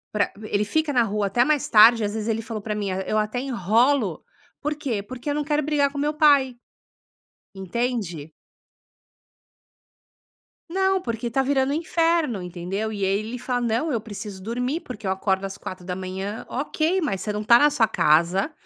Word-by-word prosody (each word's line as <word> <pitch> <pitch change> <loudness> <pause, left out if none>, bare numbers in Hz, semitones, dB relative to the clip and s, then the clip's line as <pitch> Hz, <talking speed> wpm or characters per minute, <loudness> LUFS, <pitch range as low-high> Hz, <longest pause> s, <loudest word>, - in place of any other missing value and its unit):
pra 205 - +1
ele 210 -1 0
fica 305 +6 0
na 240 -2 +4
rua 210 -1 -1
até 240 +5 +3
mais 295 -1 +1
tarde, 225 +1 +7
às 205 - -3
vezes, 220 +1 -3
ele 225 0 0
falou 225 -1 -6
para 210 0 -2
mim: 205 -2 -3
"Ah, 185 +1 -2
eu 215 - 0
até 215 +3 -1
enrolo, 235 - +1 0.4
por 295 +1 -1
quê? 245 -9 -3
Porque 255 +5 -7
eu 290 - 0
não 295 - -1
quero 295 0 0
brigar 290 -1 +1
com 285 - -8
meu 295 +2 0
pai." 285 -4 +4 1.0
Entende. 190 - -3 2.4
Não, 380 +2 +1
porque 235 -6 -4
tá 270 +2 +1
virando 270 0 +1
um - - 0
inferno, 330 - +1
entendeu. 180 +5 -4
E 200 -2 -2
aí 195 +1 +1
ele 225 +4 -5
fala: 245 0 -2
"Não, 240 +7 0
eu 230 -5 -1
preciso 205 -3 -8
dormir, 250 - -2
porque 220 -4 -9
eu 190 - +1
acordo 190 0 0
às 195 +1 -6
4h00". 185 +3 -6
Ok, 310 +6 0
mas 195 - -2
você 210 - -2
não 210 +1 -3
tá 235 +2 +6
na 295 - +5
sua 230 -6 +2
casa, 170 - +2
230 Hz, 185 wpm, -24 LUFS, 200-280 Hz, 2.4 s, tarde